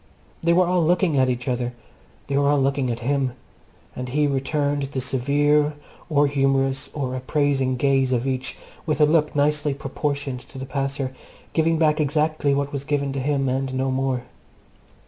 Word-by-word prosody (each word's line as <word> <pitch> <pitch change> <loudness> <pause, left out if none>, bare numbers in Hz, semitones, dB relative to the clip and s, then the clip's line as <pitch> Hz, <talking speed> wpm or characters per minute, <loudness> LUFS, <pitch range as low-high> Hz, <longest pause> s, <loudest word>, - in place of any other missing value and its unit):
They 170 - +2
were 180 +2 +5
all 180 -1 +2
looking 175 -1 +2
at 130 0 +3
each 125 0 -3
other. 125 -1 -1 0.5
They 140 - -2
were 140 0 +3
all 145 -1 +3
looking 135 -1 +1
at 115 0 -3
him; 135 0 0 0.6
and 125 0 -5
he 150 +3 +2
returned 145 +1 0
the 135 -1 -3
severe, 145 +4 +2 0.3
or 145 -2 +4
humourous, 135 -1 +1
or 130 -4 -2
appraising 135 0 0
gaze 135 0 +2
of 125 0 +1
each 130 -1 -2 0.3
with 155 - 0
a 150 - +7
look 150 -1 +2
nicely 145 0 +1
proportioned 140 -1 -3
to 130 - -13
the 130 - -5
passer, 135 -1 -2 0.4
giving 165 0 +2
back 155 -1 +3
exactly 150 -1 +1
what 140 0 -2
was 140 -1 -3
given 140 -1 -1
to 135 - -2
him, 135 0 0
and 130 0 -1
no 130 0 0
more. 130 -1 -1
140 Hz, 175 wpm, -23 LUFS, 130-150 Hz, 0.6 s, a